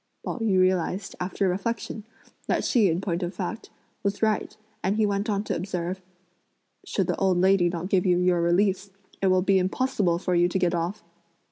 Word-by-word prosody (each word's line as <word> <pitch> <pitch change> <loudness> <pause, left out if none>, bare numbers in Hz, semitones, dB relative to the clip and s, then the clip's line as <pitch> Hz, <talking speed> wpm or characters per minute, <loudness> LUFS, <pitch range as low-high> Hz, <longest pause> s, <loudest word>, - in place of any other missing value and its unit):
Pao - - -3
yü 210 -5 +2
realised, 185 +1 0
after 190 +2 -1
reflection, 210 +3 -3 0.4
that - - 0
she, 225 -5 +4
in 170 +2 0
point 175 -2 -2
of 175 +1 -3
fact, 195 +5 -5 0.3
was 200 +2 -2
right, 215 -1 0 0.3
and 195 +2 +1
he 220 - +3
went 200 +2 -1
on 200 -1 0
to - - -2
observe: 180 0 -3 0.8
"Should - - -1
the - - -1
old 190 -2 +2
lady 185 -1 +4
not 170 +1 -4
give 190 -1 +2
you 180 -1 +4
your 180 -1 +2
release, 190 +3 +1 0.3
it 195 - +2
will 185 -1 +3
be 195 0 +3
impossible 190 -2 0
for 180 0 -2
you 175 0 +4
to 180 - -1
get 180 -1 +1
off." 175 +4 -2
185 Hz, 195 wpm, -26 LUFS, 180-200 Hz, 0.8 s, she